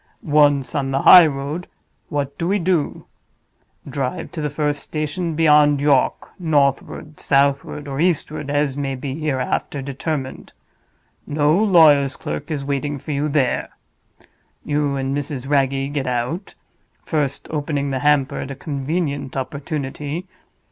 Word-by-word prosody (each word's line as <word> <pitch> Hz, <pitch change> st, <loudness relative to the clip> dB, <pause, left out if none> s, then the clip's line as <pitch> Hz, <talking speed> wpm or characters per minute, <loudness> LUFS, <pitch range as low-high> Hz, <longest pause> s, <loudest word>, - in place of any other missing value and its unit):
Once 145 Hz, -3 st, +3 dB
on 135 Hz, -2 st, -1 dB
the 135 Hz, 0 st, -1 dB
highroad, 155 Hz, -1 st, +6 dB, 0.4 s
what 140 Hz, -1 st, -2 dB
do 170 Hz, -, -1 dB
we 200 Hz, +3 st, +2 dB
do? 175 Hz, -4 st, -1 dB, 0.8 s
Drive 140 Hz, +4 st, -3 dB
to 160 Hz, -, -5 dB
the 150 Hz, -, -1 dB
first 145 Hz, -1 st, -1 dB
station 155 Hz, +2 st, -3 dB
beyond 150 Hz, -2 st, +5 dB
York, 140 Hz, -2 st, +2 dB
northward, 150 Hz, -1 st, 0 dB
southward, 140 Hz, +1 st, +1 dB
or 135 Hz, 0 st, -4 dB
eastward, 155 Hz, -3 st, 0 dB
as 145 Hz, -1 st, 0 dB
may 140 Hz, -1 st, -2 dB
be 130 Hz, +1 st, -5 dB
hereafter 140 Hz, -1 st, -2 dB
determined. 135 Hz, 0 st, -5 dB, 0.7 s
No 150 Hz, +1 st, +2 dB
lawyer's 160 Hz, -9 st, +5 dB
clerk 150 Hz, -, -5 dB
is 145 Hz, -3 st, -3 dB
waiting 145 Hz, +1 st, -2 dB
for 150 Hz, -, -7 dB
you 145 Hz, +1 st, 0 dB
there. 140 Hz, -4 st, 0 dB, 1.0 s
You 145 Hz, -1 st, 0 dB
and 135 Hz, 0 st, -2 dB
Mrs. 140 Hz, -2 st, -4 dB
Wragge 135 Hz, 0 st, +1 dB
get 140 Hz, -3 st, -2 dB
out—first 140 Hz, -, -4 dB
opening 145 Hz, -2 st, -2 dB
the 130 Hz, -, -1 dB
hamper 145 Hz, -1 st, +2 dB
at -, -, -5 dB
a 135 Hz, -, -5 dB
convenient 140 Hz, -1 st, -3 dB
opportunity. 145 Hz, +4 st, -4 dB
145 Hz, 130 wpm, -21 LUFS, 135-155 Hz, 1.0 s, highroad